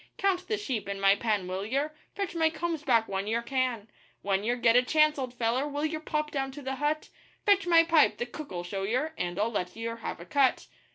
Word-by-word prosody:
'Count 370 -2 0
the 435 - 0
sheep 245 - -3
in 200 0 -3
my 195 0 +6
pen, 205 -3 -1
will 185 +1 -3
yer?' 275 +8 -1 0.2
'Fetch 395 -3 -3
my 325 -2 +3
combs 325 0 -3
back 235 -6 +3
when 195 +1 -3
yer 225 +2 +1
can.' 250 -4 -1 0.4
'When 195 0 0
yer 240 +3 +1
get 235 -1 +3
a 245 - +7
chance, 305 +3 +3
old 255 -2 -3
feller, 240 +4 0
will 290 +1 -2
yer 315 0 -2
pop 305 -1 -2
down 270 -2 -1
to 290 +1 -9
the 265 0 -3
hut?' 300 +2 -1 0.4
'Fetch 400 -2 +4
my 335 -1 +7
pipe 330 -2 +4
the 240 - -2
cook'll 245 - -7
show 195 +2 -4
yer 255 +11 -1
and 175 0 -3
I'll 215 +3 +1
let 180 -4 -3
yer 230 +1 -4
have 230 - -5
a 170 - -9
cut. 265 +7 +2
255 Hz, 235 wpm, -29 LUFS, 215-305 Hz, 0.4 s, a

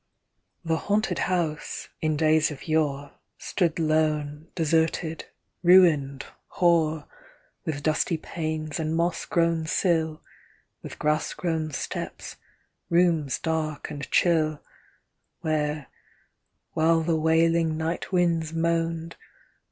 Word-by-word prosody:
The 165 0 +1
Haunted 205 -1 0
House, 165 -5 -2
in 155 -1 0
days 155 0 +3
of 150 +1 -9
yore, 145 -3 0 0.3
Stood 170 -5 -1
lone, 155 -1 0
deserted, 160 0 0 0.4
ruined, 160 -7 +5 0.3
hoar. 160 -3 +2 0.6
With 145 -2 -3
dusty 155 +2 +1
panes, 155 -1 -4
and 160 0 -1
moss 170 +1 0
grown 165 -4 +1
sill. 160 -3 0 0.6
With - - -9
grass 150 0 0
grown 160 -3 -2
steps, 140 - -5 0.5
rooms 170 -5 +2
dark 155 -2 -3
and 145 -1 -6
chill, 155 -3 +2 0.8
Where, 150 -2 -1 0.9
while 165 0 +3
the 165 0 +1
wailing 160 0 +2
night 160 +3 -3
winds 170 -3 +1
moaned. 165 0 -1
160 Hz, 105 wpm, -26 LUFS, 155-170 Hz, 0.9 s, ruined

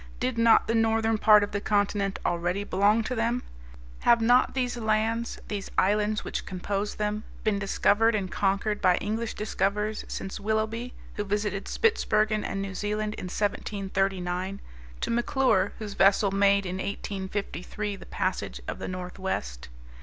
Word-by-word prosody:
Did 255 0 -1
not 230 -1 +5
the 230 - 0
northern 225 -1 +2
part 210 -1 +7
of 205 - -3
the 205 - -2
continent 205 -1 +1
already 175 +3 0
belong 205 +3 +3
to 250 - -3
them? 235 +1 0 0.6
Have 235 -1 +5
not 245 +4 +4
these 250 -2 0
lands, 225 +1 0
these 205 -2 -4
islands 210 +2 +2
which - - -3
composed 200 +2 -3
them, 210 0 -1 0.2
been 210 -2 +1
discovered 205 +3 +3
and 190 -3 -2
conquered 205 +2 0
by 185 -2 +5
English 220 +3 -2
discoverers 210 +1 -1
since 195 +2 -5
Willoughby, 220 +3 -2 0.2
who 205 - 0
visited 205 -1 -2
Spitsbergen 215 - +2
and 195 0 -3
New 195 -1 -5
Zealand 210 +2 -2
in - - -6
1739, 195 -1 -2 0.4
to - - -1
McClure, 240 -4 +2
whose 210 -2 -6
vessel 195 +1 +4
made 200 0 +3
in 180 0 -3
1853 200 0 -4
the - - -12
passage 60 - -2
of - - -4
the - - -4
northwest? 180 - -4
205 Hz, 150 wpm, -27 LUFS, 195-220 Hz, 0.6 s, part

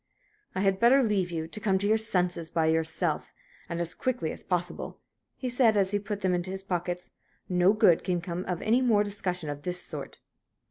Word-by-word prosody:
"I 190 - 0
had 195 -1 +2
better 260 +4 +6
leave 200 -5 +1
you 160 -2 -3
to 190 - -4
come 200 -3 +2
to 200 +2 -1
your 220 +1 +3
senses 180 -6 0
by 165 -1 +1
yourself, 160 0 0 0.4
and 170 - -3
as 170 0 -2
quickly 245 -11 -2
as - - -7
possible," 180 -1 -3 0.4
he 255 - -4
said, 240 -3 +3
as 195 -1 +2
he 205 - +1
put 205 0 -5
them 185 -2 +1
into 175 +1 -1
his 190 0 -4
pockets. 180 -1 -3 0.4
"No 180 +1 +4
good 210 -7 +4
can 180 -2 0
come 170 +1 -4
of 180 -2 -3
any 235 +4 +3
more 220 -5 +4
discussion 180 -5 -3
of 145 0 -5
this 180 +2 -2
sort." - - -5
185 Hz, 205 wpm, -28 LUFS, 175-210 Hz, 0.4 s, better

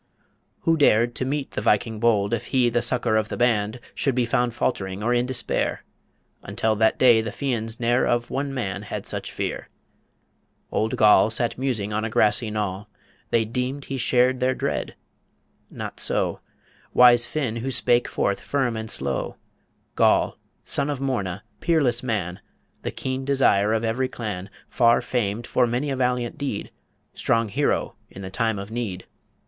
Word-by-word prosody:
Who 165 0 +2
dared 120 -5 +4
To 130 - -2
meet 140 +1 -2
the - - -3
Viking 110 +1 +1
bold, 110 -2 +2
if 115 - -2
he 125 -3 +2
The 120 +1 +1
succour 120 -3 +1
of 110 0 0
the - - -4
band, 115 -1 +1
should 135 -3 0
be 125 -1 +2
Found 120 0 0
faltering 95 -5 -2
or 120 +2 +2
in 120 +1 +1
despair? 130 -1 -1 0.6
Until 110 -1 -1
that 110 +1 +3
day 120 -3 +6
the 110 - -4
Fians 115 -5 -3
ne'er 120 +1 +2
Of 120 0 0
one 140 +1 -2
man 100 -7 -3
had 105 - -6
such - - -4
fear. - - -4 1.0
Old 110 +1 0
Goll 105 0 +6
Sat 115 +1 -1
musing 115 -6 -2
on 110 +1 -1
a 115 - -2
grassy 110 +1 +2
knoll, 105 -1 -3 0.4
They 115 -1 +2
deemed 125 +5 -3
he 135 - -4
shared 125 +1 +3
their 130 0 +1
dread... - - -3 0.7
Not - - -7
so - - +2 0.6
Wise 120 -1 +7
Finn, 130 -7 -2
who 120 +3 -3
spake 120 -1 +2
forth 100 -1 -1
firm 130 -5 -1
and 110 0 -5
slow 70 -8 -2 0.6
"Goll, - - +3 0.3
son 140 +1 -1
of 145 -3 -2
Morna, 105 -9 -2 0.2
peerless 140 -8 +2
man, 100 -6 -3 0.4
The - - -3
keen 130 0 -4
desire 130 -7 +3
of 110 0 0
every 120 +3 0
clan, 105 -6 -5 0.2
Far 120 -1 +4
famed 120 -2 -2
for 125 0 +2
many 125 +5 -1
a - - -1
valiant 125 +2 -1
deed, 135 -8 -4 0.4
Strong 115 -1 0
hero - - 0 0.2
in 95 - -10
the 95 - -7
time 115 0 0
of 100 +2 -7
need. 110 -6 -4
120 Hz, 170 wpm, -24 LUFS, 110-130 Hz, 1.0 s, Wise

